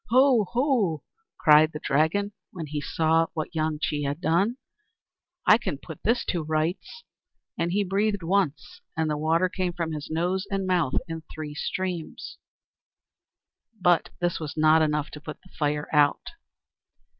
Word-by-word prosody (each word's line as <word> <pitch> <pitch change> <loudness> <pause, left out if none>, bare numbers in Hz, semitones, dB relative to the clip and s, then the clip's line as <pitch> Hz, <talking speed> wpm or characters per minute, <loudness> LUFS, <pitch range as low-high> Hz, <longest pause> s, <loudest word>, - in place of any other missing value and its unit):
"Ho! 250 -4 +5
ho!" 235 - +1 0.3
cried 155 +1 +6
the 150 - -5
Dragon, 160 +10 +1 0.2
when 170 -3 -6
he 150 0 -4
saw 165 +2 +2
what 155 -1 -3
Wang 155 -1 -1
Chih 150 -1 -1
had 145 +2 -2
done, 185 +8 +1 0.9
"I 220 - +7
can 210 - -3
soon - - -14
put 160 -4 -9
this 235 +3 +1
to 175 - 0
rights." 160 - -2 0.5
And 170 +1 -1
he 205 +3 +2
breathed 200 0 0
once, 195 - -1 0.2
and 160 -1 +1
the - - 0
water 160 +4 +2
came 180 -1 -2
from 170 -2 -3
his 150 -1 -5
nose 180 +5 -1
and 195 -1 -1
mouth 175 -7 +1
in 165 -1 -5
three 155 -1 -6
streams. 180 +2 -4 1.4
But 175 -2 +3
this 175 -1 0
was 155 -2 -6
not 155 +1 +5
enough 150 -1 0
to 150 - -9
put 155 -1 -8
the 185 - -19
fire 150 -1 -1
out. 145 -1 +3
165 Hz, 160 wpm, -26 LUFS, 155-190 Hz, 1.4 s, I